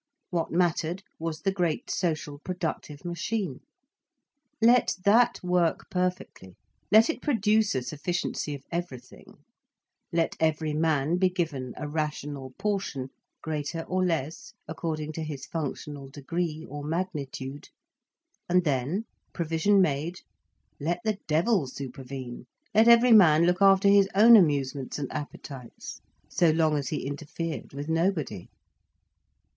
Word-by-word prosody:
What 170 Hz, -2 st, -1 dB
mattered 175 Hz, +1 st, 0 dB, 0.2 s
was 160 Hz, -1 st, -4 dB
the 195 Hz, -, +1 dB
great 175 Hz, -5 st, -1 dB
social 155 Hz, -4 st, -2 dB
productive 160 Hz, -3 st, -5 dB
machine. 175 Hz, -, -3 dB, 1.0 s
Let 240 Hz, +2 st, +4 dB
that 235 Hz, +4 st, +4 dB
work 180 Hz, -2 st, 0 dB
perfectly, 180 Hz, -, -3 dB, 0.4 s
let 220 Hz, +2 st, +7 dB
it 325 Hz, -, -3 dB
produce 215 Hz, -, +2 dB
a 130 Hz, -, -1 dB
sufficiency 150 Hz, +1 st, -3 dB
of 140 Hz, -, -11 dB
everything, 170 Hz, -7 st, -7 dB, 0.7 s
let 165 Hz, -1 st, 0 dB
every 155 Hz, -1 st, +1 dB
man 155 Hz, 0 st, +1 dB
be 185 Hz, 0 st, +3 dB
given 155 Hz, -9 st, -3 dB
a 150 Hz, -, -4 dB
rational 145 Hz, -3 st, -4 dB
portion, 195 Hz, -10 st, -2 dB, 0.3 s
greater 155 Hz, +1 st, -3 dB
or 185 Hz, +2 st, -1 dB
less 160 Hz, -4 st, -2 dB
according 155 Hz, -1 st, -4 dB
to 160 Hz, +1 st, -5 dB
his 145 Hz, -3 st, -6 dB
functional 145 Hz, -3 st, -5 dB
degree 160 Hz, +3 st, -3 dB
or 145 Hz, +1 st, -7 dB
magnitude, 145 Hz, -4 st, -4 dB, 0.8 s
and 180 Hz, +1 st, +4 dB
then, 150 Hz, -, -1 dB, 0.3 s
provision 170 Hz, +4 st, +3 dB
made, 155 Hz, +3 st, -2 dB, 0.6 s
let 165 Hz, +4 st, -1 dB
the 215 Hz, -3 st, -1 dB
devil 165 Hz, -, +2 dB
supervene, 130 Hz, -1 st, -7 dB, 0.3 s
let 220 Hz, +2 st, +5 dB
every 235 Hz, +1 st, +7 dB
man 170 Hz, -7 st, +7 dB
look 180 Hz, +2 st, +1 dB
after 195 Hz, 0 st, +6 dB
his 200 Hz, -1 st, +5 dB
own 230 Hz, +4 st, +9 dB
amusements 140 Hz, -, +2 dB
and 140 Hz, -3 st, -4 dB
appetites, 135 Hz, -3 st, -8 dB, 0.3 s
so 175 Hz, -2 st, +3 dB
long 155 Hz, -1 st, +2 dB
as 145 Hz, -2 st, -2 dB
he 150 Hz, -, -3 dB
interfered 155 Hz, +3 st, -5 dB
with 145 Hz, +2 st, -6 dB
nobody. 165 Hz, -, -1 dB
160 Hz, 125 wpm, -27 LUFS, 145-185 Hz, 1.0 s, own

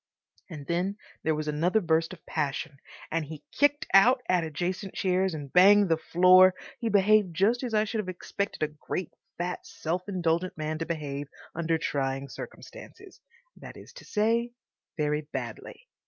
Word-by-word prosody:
And 150 Hz, -5 st, -8 dB
then 180 Hz, +6 st, -1 dB, 0.2 s
there 160 Hz, -1 st, +1 dB
was 155 Hz, 0 st, -4 dB
another 165 Hz, +8 st, +2 dB
burst 165 Hz, -3 st, +1 dB
of 185 Hz, -, -12 dB
passion, 145 Hz, -1 st, -3 dB, 0.3 s
and 165 Hz, 0 st, 0 dB
he 150 Hz, 0 st, -9 dB
kicked 290 Hz, +1 st, +2 dB
out 250 Hz, +6 st, +6 dB
at 180 Hz, -2 st, +2 dB
adjacent 175 Hz, +5 st, -4 dB
chairs 185 Hz, -1 st, +1 dB
and 145 Hz, -3 st, -8 dB
banged 200 Hz, +2 st, +7 dB
the 165 Hz, -, +3 dB
floor. 185 Hz, +3 st, +6 dB, 0.2 s
He 230 Hz, -2 st, -1 dB
behaved 205 Hz, -3 st, +3 dB
just 215 Hz, +7 st, +2 dB
as 240 Hz, -4 st, -2 dB
I 215 Hz, -, +4 dB
should 220 Hz, +1 st, -3 dB
have 195 Hz, -3 st, -3 dB
expected 185 Hz, 0 st, -4 dB
a -, -, +2 dB
great, 160 Hz, +3 st, -5 dB, 0.3 s
fat, 180 Hz, +1 st, -3 dB
self 175 Hz, +4 st, -4 dB
indulgent 175 Hz, -2 st, -1 dB
man 155 Hz, 0 st, -3 dB
to 165 Hz, -, -3 dB
behave 145 Hz, -3 st, -4 dB, 0.3 s
under 165 Hz, 0 st, 0 dB
trying 135 Hz, -2 st, -2 dB
circumstances—that -, -, -12 dB
is -, -, -13 dB
to -, -, -12 dB
say, 230 Hz, +3 st, 0 dB, 0.4 s
very 150 Hz, -1 st, 0 dB
badly. -, -, -7 dB
180 Hz, 160 wpm, -28 LUFS, 155-205 Hz, 0.4 s, banged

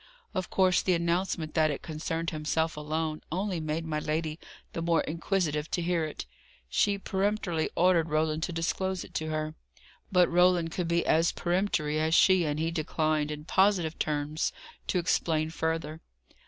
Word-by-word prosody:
Of 185 Hz, -3 st, -2 dB
course 185 Hz, -1 st, +3 dB
the 185 Hz, -, +2 dB
announcement 170 Hz, -2 st, -1 dB
that 155 Hz, -1 st, +3 dB
it 145 Hz, -, -4 dB
concerned 165 Hz, +1 st, -3 dB
himself 160 Hz, +1 st, -1 dB
alone, 155 Hz, +1 st, -2 dB
only 185 Hz, +1 st, -1 dB
made 155 Hz, +1 st, -2 dB
my 155 Hz, -1 st, -1 dB
lady 155 Hz, +1 st, -2 dB, 0.3 s
the 165 Hz, -, -3 dB
more 165 Hz, 0 st, +2 dB
inquisitive 160 Hz, -2 st, -1 dB
to 175 Hz, -, -1 dB
hear 170 Hz, -2 st, +1 dB
it. 155 Hz, -, -6 dB, 0.4 s
She 200 Hz, -, +2 dB
peremptorily 195 Hz, -4 st, -1 dB
ordered 170 Hz, -2 st, +3 dB
Roland 155 Hz, +1 st, +1 dB
to -, -, -5 dB
disclose 180 Hz, +2 st, -1 dB
it -, -, -14 dB
to 155 Hz, -, -2 dB
her. 155 Hz, 0 st, -2 dB, 0.6 s
But 180 Hz, -2 st, +5 dB
Roland 175 Hz, -1 st, +3 dB
could 175 Hz, 0 st, -2 dB
be 170 Hz, 0 st, +1 dB
as 165 Hz, +1 st, +3 dB
peremptory 175 Hz, -4 st, 0 dB
as 160 Hz, +1 st, +2 dB
she, 185 Hz, -1 st, +5 dB
and 150 Hz, 0 st, -1 dB
he 165 Hz, +1 st, 0 dB
declined, 155 Hz, -2 st, 0 dB
in 150 Hz, 0 st, -6 dB
positive 180 Hz, -3 st, +2 dB
terms, 150 Hz, 0 st, -1 dB, 0.4 s
to -, -, +1 dB
explain 160 Hz, -2 st, +1 dB
further. 160 Hz, -1 st, -2 dB
165 Hz, 165 wpm, -29 LUFS, 155-180 Hz, 0.6 s, But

